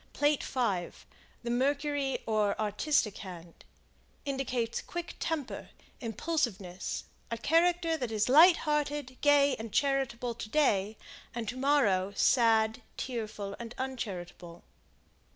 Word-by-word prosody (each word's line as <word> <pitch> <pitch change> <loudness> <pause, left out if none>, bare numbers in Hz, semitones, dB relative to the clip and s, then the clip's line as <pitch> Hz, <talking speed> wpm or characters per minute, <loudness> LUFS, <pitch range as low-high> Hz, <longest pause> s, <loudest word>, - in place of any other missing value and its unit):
Plate 290 0 +2
V 205 -9 0 0.6
The 235 - -2
Mercury 280 +2 0
or 215 -2 +1
Artistic 215 +2 +1
Hand, 175 -3 -10 0.6
indicates 255 -4 -2
quick 345 0 -6
temper, 315 -5 -3 0.3
impulsiveness; 225 - -2 0.3
a 230 - -2
character 330 +5 +2
that 245 -6 -3
is 215 -1 +1
light 330 +7 +8
hearted, 295 -3 -1
gay 285 -2 +5
and 220 0 -7
charitable, 260 -2 0
to 225 -2 -7
day; 215 -7 +2 0.4
and 235 -2 -3
to 250 - -4
morrow, 240 -9 +2
sad, 225 -1 +3 0.2
tearful 215 -5 -4
and 235 0 -7
uncharitable. 180 -9 -6
245 Hz, 115 wpm, -30 LUFS, 215-285 Hz, 0.6 s, light